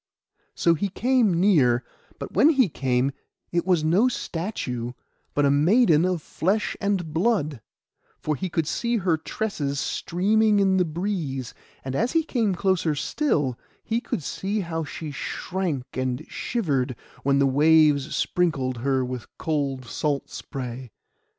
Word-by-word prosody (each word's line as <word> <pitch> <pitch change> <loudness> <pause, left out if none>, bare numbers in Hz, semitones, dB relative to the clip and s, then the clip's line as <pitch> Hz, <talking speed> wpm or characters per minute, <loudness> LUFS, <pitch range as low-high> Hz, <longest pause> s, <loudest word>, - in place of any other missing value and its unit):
So 170 - +3
he 195 +5 -1
came 230 -4 +2
near; 140 -11 +4 0.3
but - - -7
when 305 - +6
he 265 - +4
came, 130 -2 0 0.4
it 170 +1 0
was 175 -4 +3
no 180 +10 +4
statue, 150 - -3 0.4
but 145 - +3
a 140 - +4
maiden 165 - +4
of 180 -3 -1
flesh 200 +5 -1
and 190 -6 -1
blood; 160 - +1 0.6
for 155 - -1
he 185 +4 -3
could 165 -2 0
see 235 +9 0
her 180 -5 +2
tresses 155 -4 -3
streaming 210 +7 +2
in 190 -1 +3
the 180 - +3
breeze; 160 - -3 0.3
and 130 0 -3
as 235 - 0
he 325 -1 +3
came 225 -10 0
closer 175 -5 +1
still, 145 - 0 0.2
he 230 +1 -1
could 175 - -3
see 200 +8 -2
how 165 -2 -3
she 160 0 -6
shrank 165 -2 -3
and 130 -1 -2
shivered 140 - -1 0.3
when 140 0 +2
the 140 - +4
waves 150 +1 +4
sprinkled 145 -9 0
her 130 +1 0
with 125 -2 -6
cold 140 -5 -2
salt 140 +3 -2
spray. 125 -1 -6
160 Hz, 145 wpm, -25 LUFS, 140-195 Hz, 0.6 s, when